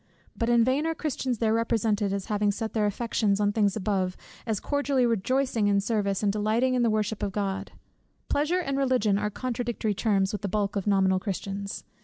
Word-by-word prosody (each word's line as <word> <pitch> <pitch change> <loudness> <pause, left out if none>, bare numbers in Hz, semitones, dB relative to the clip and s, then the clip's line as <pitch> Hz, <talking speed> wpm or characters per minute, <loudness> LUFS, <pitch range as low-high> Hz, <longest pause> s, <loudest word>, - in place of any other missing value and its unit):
But 230 -1 -1
in 235 -1 +5
vain 270 +6 +1
are 325 - -1
Christians 265 -5 -2
there 220 0 +1
represented 225 -3 +1
as 195 -1 -2
having 210 -1 +1
set 220 +2 -4
their 215 -2 +2
affections 210 -1 0
on 205 0 +2
things 205 -2 +1
above, 190 -3 -1 0.3
as 220 -3 0
cordially 285 -3 +1
rejoicing 235 0 +1
in 200 - +3
the 200 - +3
service, 205 -2 -1
and 200 -1 +2
delighting 220 +5 +1
in 250 - +2
the 235 - +3
worship 215 0 -1
of 200 - -1
God. 195 -1 -2 0.6
Pleasure 305 +5 +1
and 275 -4 -2
Religion 250 -7 +2
are 210 0 -1
contradictory 240 -2 -2
terms 195 -2 +1
with 210 - -4
the 200 - -2
bulk 205 0 -1
of 200 0 -2
nominal 190 -2 +3
Christians. 200 +1 -4
215 Hz, 200 wpm, -27 LUFS, 200-240 Hz, 0.6 s, in